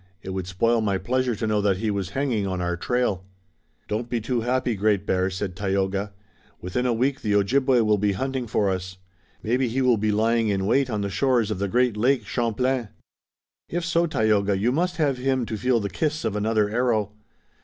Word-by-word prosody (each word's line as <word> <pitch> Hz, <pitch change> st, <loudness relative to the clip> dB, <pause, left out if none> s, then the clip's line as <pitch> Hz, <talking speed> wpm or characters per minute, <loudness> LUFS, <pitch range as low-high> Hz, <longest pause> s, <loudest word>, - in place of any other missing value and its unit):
It 95 Hz, -, -5 dB
would 95 Hz, -1 st, -4 dB
spoil 115 Hz, +5 st, +1 dB
my 100 Hz, -3 st, +1 dB
pleasure 125 Hz, +5 st, 0 dB
to 110 Hz, -, -3 dB
know 105 Hz, -1 st, +1 dB
that 100 Hz, -2 st, +2 dB
he 110 Hz, +2 st, -1 dB
was 100 Hz, -3 st, -2 dB
hanging 120 Hz, -8 st, 0 dB
on 95 Hz, -1 st, -2 dB
our 90 Hz, 0 st, -1 dB
trail." 105 Hz, 0 st, -1 dB, 0.6 s
"Don't 115 Hz, +3 st, -3 dB
be 120 Hz, -, 0 dB
too 120 Hz, +2 st, -1 dB
happy, 125 Hz, +1 st, 0 dB
Great 100 Hz, -1 st, +1 dB
Bear," 95 Hz, -1 st, +1 dB
said 95 Hz, -1 st, -4 dB
Tayoga. 100 Hz, 0 st, -1 dB, 0.5 s
"Within 125 Hz, +8 st, -2 dB
a -, -, +2 dB
week 130 Hz, +4 st, 0 dB
the 105 Hz, -1 st, 0 dB
Ojibway 130 Hz, +5 st, +3 dB
will 105 Hz, -2 st, +2 dB
be 100 Hz, 0 st, +1 dB
hunting 130 Hz, +3 st, -3 dB
for 105 Hz, -2 st, +1 dB
us. 95 Hz, 0 st, -5 dB, 0.5 s
Maybe 125 Hz, +3 st, +1 dB
he 130 Hz, +3 st, -1 dB
will 125 Hz, -2 st, +4 dB
be 105 Hz, 0 st, 0 dB
lying 115 Hz, +2 st, +2 dB
in 100 Hz, -2 st, 0 dB
wait 135 Hz, +5 st, +2 dB
on 105 Hz, -3 st, -2 dB
the 100 Hz, -, -2 dB
shores 120 Hz, -3 st, +1 dB
of 100 Hz, -, -3 dB
the 100 Hz, -, 0 dB
great 125 Hz, +2 st, +2 dB
lake, 120 Hz, +1 st, +1 dB
Champlain." 120 Hz, +1 st, -1 dB, 0.8 s
"If 175 Hz, 0 st, -2 dB
so, 170 Hz, 0 st, +2 dB
Tayoga, 105 Hz, -8 st, +1 dB
you 110 Hz, +6 st, +1 dB
must 175 Hz, +5 st, 0 dB
have 140 Hz, -5 st, +1 dB
him 130 Hz, -1 st, 0 dB
to 110 Hz, -, -4 dB
feel 125 Hz, +2 st, +1 dB
the 100 Hz, -, -2 dB
kiss 155 Hz, +5 st, -2 dB
of 110 Hz, -2 st, -1 dB
another 105 Hz, 0 st, +1 dB
arrow." 110 Hz, -2 st, 0 dB
110 Hz, 210 wpm, -24 LUFS, 100-125 Hz, 0.8 s, will